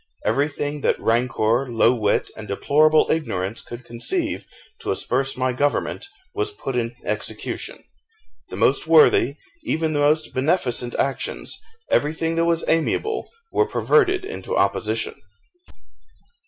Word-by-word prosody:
Everything 145 +4 -1
that - - +1
rancour, 120 +1 +1
low 115 +1 +4
wit, 105 -4 0
and 110 -1 -9
deplorable 155 +10 +4
ignorance 110 - -2
could 120 +1 -10
conceive 120 0 -2 0.3
to - - -6
asperse 135 +1 0
my 130 0 0
government, 145 - -1 0.3
was 415 +1 -1
put 135 - -5
in 120 -1 -1
execution. - - -3 0.7
The - - -6
most - - +2
worthy, 410 -4 +5 0.3
even 160 - 0
the 145 - 0
most 150 +2 +2
beneficent 130 -4 0
actions, 135 -1 -2 0.3
everything 160 +2 +1
that 165 - +3
was 170 0 +1
amiable, 425 - 0 0.2
were 430 - +2
perverted 380 -4 +2
into 425 - -4
opposition. - - 0
145 Hz, 125 wpm, -22 LUFS, 120-165 Hz, 0.7 s, worthy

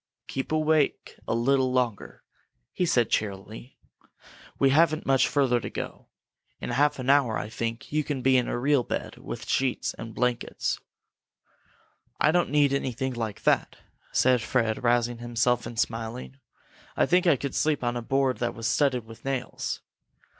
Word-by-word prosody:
"Keep 135 +2 -4
awake 155 -1 +1
a - - 0
little 130 +2 +2
longer," 125 -5 -2 0.5
he 180 - 0
said, 120 -7 +2
cheerily. 105 +4 -3 0.8
"We 135 -1 +4
haven't 155 +1 +3
very 135 - +2
much 135 0 +4
further 135 -4 +2
to - - -6
go. - - -7 0.5
In - - -4
half 145 +1 +2
an 130 -1 -5
hour, 135 -5 +4
I 105 - -4
think, 115 0 -4
you 155 +1 +1
can 140 -3 -3
be 130 0 +4
in 125 -1 +3
a - - -2
real 140 +2 +3
bed, - - -4
with - - -7
sheets 130 -2 0
and 115 -1 -9
blankets." 125 -1 -1 1.4
"I 155 - +4
don't 175 +1 +2
need 145 -2 +3
anything 130 -1 -2
like 115 -4 -4
that," - - +2 0.4
said 125 -2 +3
Fred, 115 -3 0
rousing 120 0 +2
himself 120 +1 0
and 120 - -8
smiling. 115 +4 -3 0.6
"I - - +4
think 180 +1 +3
I 165 - +6
could 140 +1 -4
sleep 150 -3 +1
on 120 0 0
a 120 - -2
board 135 +1 0
that 120 - -1
was 115 - -6
studded 130 -3 +1
with 115 +1 -13
nails! 135 -2 -3
125 Hz, 170 wpm, -27 LUFS, 120-140 Hz, 1.4 s, I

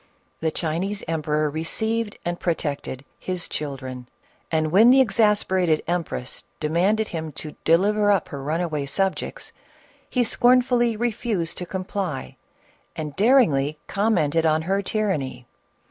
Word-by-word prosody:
The 160 - 0
Chinese 175 +6 -2
emperor 155 -1 0
received 210 +8 -2
and 175 0 -2
protected 145 -5 -3
" - - -42
his 180 -2 -1
children," 130 -4 -5 0.4
and 155 -1 +1
when 215 +7 +7
the 265 +2 +7
exasper 210 -5 +3
ated 160 -3 +2
empress 170 -7 -3 0.2
demanded 185 +8 +1
him 160 -2 -4
to 150 +2 -8
deliver 205 +5 +3
up 195 -5 +1
her 140 - -6
run 155 +5 -1
away 150 -5 -2
subjects, 195 - -2 0.6
he 250 - +2
scornfully 245 -1 +3
refused 215 -6 -2
to 180 - -5
comply 185 - -4 0.6
and 150 -2 -5
daringly 170 - +3
commented 170 -7 +1
on 160 0 +2
her 195 +4 0
tyranny. 165 - -2
175 Hz, 130 wpm, -24 LUFS, 155-210 Hz, 0.6 s, when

